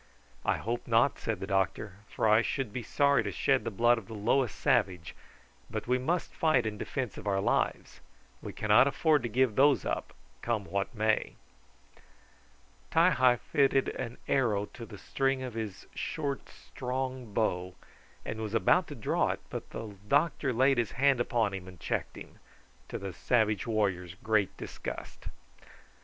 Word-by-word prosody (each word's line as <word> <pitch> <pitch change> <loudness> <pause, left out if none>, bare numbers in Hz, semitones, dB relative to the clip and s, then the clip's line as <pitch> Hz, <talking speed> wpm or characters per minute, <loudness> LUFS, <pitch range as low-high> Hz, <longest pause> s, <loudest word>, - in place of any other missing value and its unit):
"I - - +1
hope 120 +2 -4
not," 120 +3 +3
said 110 -4 -2
the - - -2
doctor, 95 +1 -1
"for - - 0
I 110 +1 +6
should 130 -3 -2
be 125 - -3
sorry 140 +1 +3
to 100 -2 -3
shed - - +1
the - - -2
blood 120 +3 +3
of 100 - -15
the 110 - -8
lowest 115 +3 +1
savage; 90 -4 +1 0.6
but - - -4
we 125 +1 +2
must 170 +7 -1
fight 155 -7 +2
in 105 -1 -3
defence 130 -6 -4
of - - -9
our 100 -1 +1
lives. - - -1 0.4
We - - -6
cannot 110 +5 +4
afford 150 +1 +2
to 120 - -3
give 125 -1 +2
those 140 +1 +4
up, - - -3 0.3
come 115 -4 -1
what 100 +6 -3
may." 110 0 +1 1.6
Ti 165 +3 +5
hi 130 -4 +4
fitted 135 +2 +2
an 120 -1 -5
arrow 110 -7 +2
to 115 -2 -9
the 105 - -10
string 135 +4 -1
of 125 -2 -5
his 110 -4 -5
short, 140 -2 -3
strong 130 -2 -5
bow, 90 -4 -1 0.5
and 110 0 -4
was 110 0 -3
about 175 +9 +3
to 145 - -7
draw 115 - 0
it, - - -2
but - - -6
the 105 -3 -7
doctor 140 +1 +2
laid 130 +2 +3
his 115 - -1
hand 135 -1 +3
upon 115 -4 +1
him 95 -1 -6
and 90 -2 -12
checked - - -3
him, - - -12 0.5
to - - -4
the 95 -1 -6
savage 110 0 +1
warrior's 95 -6 -1
great 110 0 0
disgust. - - -7
115 Hz, 170 wpm, -30 LUFS, 105-130 Hz, 1.6 s, I